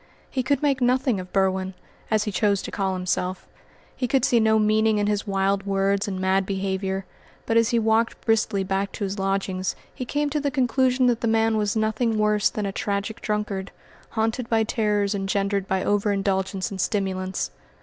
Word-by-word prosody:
He 260 - 0
could 280 +4 0
make 275 -2 +2
nothing 250 -3 +2
of 180 0 -8
Berwin 190 -1 0 0.3
as 215 -1 +2
he 210 - -3
chose 200 0 +1
to - - -6
call 190 -2 -1
himself 185 0 -2 0.5
he 250 - -1
could 260 0 +2
see 240 - +3
no 220 0 +4
meaning 215 0 +3
in 205 - +1
his 205 -1 -1
wild 195 0 0
words 195 +1 +1
and 190 -2 -3
mad 190 +1 +2
behaviour; 190 0 -2 0.4
but 225 - 0
as 230 -1 +4
he 235 - +2
walked 225 +1 +2
briskly 220 -3 +2
back 195 +1 -1
to - - -4
his 195 +1 -3
lodgings 195 -1 -1 0.2
he - - -5
came 290 +3 -1
to 300 - 0
the 285 0 0
conclusion 260 -1 +2
that 240 -2 +2
the 230 - 0
man 225 0 +2
was 210 -1 0
nothing 220 +1 +1
worse 210 -1 +3
than 210 - -3
a 195 - -2
tragic 200 +2 -3
drunkard, 210 -2 -2 0.4
haunted 225 +2 -1
by 225 -1 +3
terrors 210 -2 0
engendered 195 0 -1
by 190 0 0
over 205 0 +1
indulgence 195 -1 -1
in 195 - -6
stimulants. 190 - -1
205 Hz, 190 wpm, -24 LUFS, 195-225 Hz, 0.5 s, no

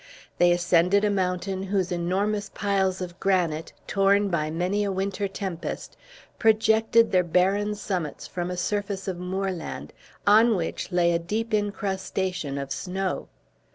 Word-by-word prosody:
They 175 0 +6
ascended 175 +3 +3
a 205 - +2
mountain, 190 0 -1
whose 190 -1 -1
enormous 195 +4 -1
piles 190 -2 0
of 175 0 -6
granite, 175 -5 0
torn 200 0 +3
by 155 -4 0
many 180 +6 0
a 200 - -1
winter 195 +1 -1
tempest, 190 -3 -5 0.4
projected 220 +1 +4
their 185 - +5
barren 195 +5 +1
summits 180 -7 -4
from 175 0 -4
a 180 - -4
surface 200 +1 -2
of 185 -2 -3
moorland, 185 -1 -4 0.3
on 220 +2 +6
which 170 +1 -3
lay 175 -1 +3
a 170 - +1
deep 215 +6 -3
incrustation 190 -6 -2
of 140 -1 -5
snow. 190 +4 -3
190 Hz, 140 wpm, -26 LUFS, 175-205 Hz, 0.4 s, They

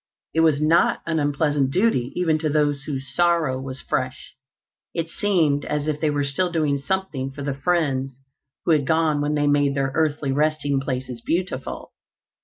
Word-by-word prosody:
It 160 - +1
was 160 -3 +4
not 155 +3 +3
an 165 -1 0
unpleasant 145 -1 +1
duty, 150 - +1
even 165 -3 +1
to 155 -1 0
those 145 -1 +1
whose 135 -3 -5
sorrow 170 -6 +2
was 135 0 -6
fresh. 130 0 -3 0.6
It 165 -1 -2
seemed 165 -7 +1
as 150 0 -2
if 150 -1 -2
they 155 - +2
were 145 -1 0
still 140 +6 0
doing 150 -4 +1
something 155 -4 -2
for 140 +1 -8
the 140 -1 -1
friends 135 -4 -1 0.5
who - - +3
had 145 -4 +2
gone 160 -2 +2
when 150 +1 0
they 145 0 +1
made 145 -1 +2
their 135 -1 0
earthly 150 -3 0
resting 145 -1 +1
places 130 -3 -4
beautiful. 170 -5 -3
145 Hz, 175 wpm, -23 LUFS, 135-160 Hz, 0.6 s, was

